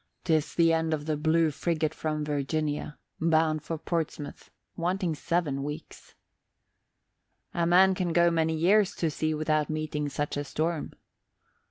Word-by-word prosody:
'Tis 160 -4 +1
the 165 -1 +4
end 160 -1 +1
of 150 -1 -8
the 155 -1 0
Blue 160 +1 +2
Friggat 160 0 -1
from 155 -1 -2
Virginia, 150 +1 -2 0.2
bound 160 -1 +2
for 165 - -4
Portsmouth, 155 -3 -4 0.3
wanting 180 0 -1
seven 150 -3 -1
weeks." 150 +3 -8 1.4
"A 170 -1 +1
man 190 +2 +6
can 180 -2 -1
go 170 0 +4
many 160 -1 +1
years 195 +5 +3
to 165 -2 0
sea 155 +1 -1
without 155 0 0
meeting 155 -1 -2
such 145 +1 -3
a 145 - -1
storm." 160 +2 -2
160 Hz, 145 wpm, -28 LUFS, 150-170 Hz, 1.4 s, man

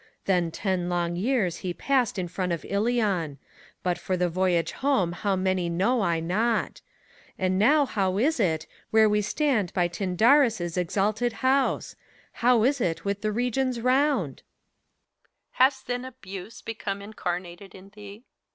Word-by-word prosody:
Then 180 -3 +2
ten 180 0 -2
long 175 -1 -1
years 200 -3 0
he 180 -2 -4
passed 255 -6 +1
in 180 -2 -2
front 180 +1 -3
of 170 - -3
Ilion; 200 - 0 0.5
But 180 -1 0
for 185 - -2
the 180 0 +1
voyage 175 -2 +1
home 265 -11 +1
how 195 +3 -1
many 185 -2 0
know 200 +9 +1
I 170 -4 +1
not. 215 +8 -1 0.6
And 185 0 0
now 285 +7 +5
how 195 -6 -1
is 275 +6 +1
it, 160 -6 +1 0.2
where 220 0 +5
we 210 0 +2
stand 215 - 0
by 175 -2 +2
Tyndarus' 195 - +2
Exalted 210 +6 0
House 270 +1 +1
T - - -34 0.4
Hov 240 -2 +4
is 275 0 +1
it 170 -3 -1
with 200 0 -2
the 215 - 0
regions 250 +2 -1
round 255 - +1
t - - -21 1.1
HELENA. - - +3
Has 265 -1 -16
then 245 0 -3
Abuse 220 -5 -9
become 200 -3 -5
incarnated 180 -2 -5
in 190 +1 -13
thee. 205 +2 -12
200 Hz, 160 wpm, -26 LUFS, 180-240 Hz, 1.1 s, now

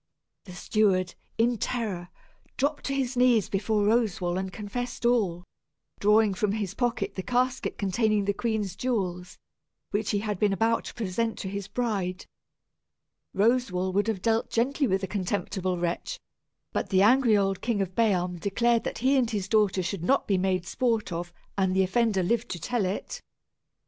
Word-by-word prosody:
The 180 - -10
steward, 185 -2 +1 0.2
in 230 0 +2
terror, 200 -9 -3 0.5
dropped 285 +1 -1
upon 275 - -1
his 260 -1 -1
knees 245 -4 +4
before 210 +1 0
Roswal 205 -6 +1
and 190 0 -4
confessed 240 +4 -5
all, 200 -8 +2 0.6
drawing 210 0 +4
from 200 +1 0
his 205 -3 -3
pocket 215 -4 -1
the 190 - -4
casket 250 +4 0
containing 210 +1 +1
the 200 - +1
queen's 210 -4 -2
jewels, 185 -7 -2 0.5
which 205 +1 -1
he 205 - +1
had 205 -2 -2
been 205 -2 +3
about 225 +3 +1
to - - -8
present 225 +1 -2
to 190 - -4
his 200 0 -5
bride. 200 -5 -2 1.1
Roswal 195 -4 +1
would 205 +3 +1
have 210 -5 -2
dealt 225 0 +1
gently 270 +4 +1
with 190 -2 +1
the 190 - -2
contemptible 185 -1 -2
wretch, 175 - -3 0.5
but - - -2
the 190 -1 +4
angry 235 -1 +5
old 195 -1 0
King 230 -3 0
of 190 -2 -2
Bealm 180 -5 +1
declared 230 +5 +1
that - - -3
he 275 +1 +5
and 245 -3 +2
his 205 -4 -2
daughter 205 -3 +2
should 180 -1 -3
not 275 +9 +2
be 195 -2 +2
made 185 -1 0
sport 225 0 0
of, 175 +1 -4 0.3
and 190 -1 +2
the 190 - +4
offender 195 0 +1
live 230 +5 0
to 175 - -5
tell 230 +4 -1
it. 185 +3 -4
205 Hz, 170 wpm, -27 LUFS, 190-230 Hz, 1.1 s, angry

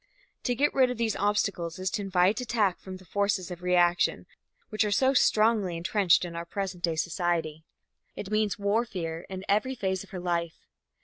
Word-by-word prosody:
To 245 - +1
get 290 +4 +2
rid 260 -2 +4
of 250 - -4
these 225 -2 0
obstacles 200 -5 -1
is 185 0 -2
to 215 - -2
invite 195 +3 +2
attack 215 -6 0
from 190 -1 -8
the 185 - -17
forces 200 -1 -1
of 175 0 -7
reaction 175 -1 +2 0.4
which 215 0 +1
are 210 - 0
so 260 +6 +3
strongly 215 -7 +3
entrenched 180 +1 +2
in 170 -1 -7
our 170 - -4
present 185 0 -5
day 165 -2 +1
society. 160 -2 -2 0.5
It 200 - -7
means 215 -1 +1
warfare 200 -6 -2
in 190 0 -6
every 215 +6 +1
phase 190 -5 -2
of - - -16
her 190 - -6
life. 170 -2 -3
190 Hz, 185 wpm, -28 LUFS, 175-215 Hz, 0.5 s, rid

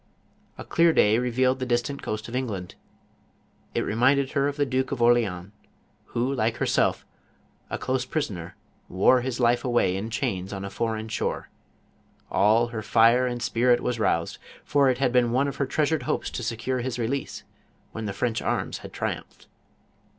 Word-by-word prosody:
A - - -8
clear 170 -1 +3
day 110 -3 +4
re 125 0 -1
vealed 130 +2 +2
the 130 - -2
distant 120 +3 -1
coast 110 +1 -4
of 120 - -6
England; 105 -9 -3 1.0
it - - +2
reminded 130 +5 +2
her 140 -1 +1
of 145 0 -3
the 145 - +2
Duke 130 0 -1
of 135 - -3
Orleans, 110 -6 +2 0.5
who, 125 +4 -1
like 115 -3 0
herself, - - +1 0.6
a - - -3
close 130 -1 -1
pris 150 -1 -2
oner, 85 -3 -8 0.3
\vore 100 +7 +4
his 130 -1 -3
life 120 0 +3
away 120 -8 +2
in 100 +4 -4
chains 95 -3 -2
on 95 0 -5
a 100 - -6
foreign 110 -1 -2
shore; 115 - -3 0.8
all 110 +4 +3
her 115 -2 -4
fire 115 +3 +4
and 120 -1 -3
spirit 120 +4 +3
was 120 -2 -2
roused, 85 -6 0 0.2
for 140 -2 +3
it 125 - +1
had 135 -1 +1
been 120 -1 +3
one 130 +4 +2
of 140 - -5
her 140 - 0
treasured 155 +3 +1
hopes - - -2
to - - -4
secure 120 +2 -2
his 125 0 -3
release, 125 +3 -3 0.5
when 110 -1 -5
the 100 - -2
French 115 0 -1
arms - - -2
had - - -10
triumphed. - - -5
120 Hz, 180 wpm, -25 LUFS, 110-130 Hz, 1.0 s, day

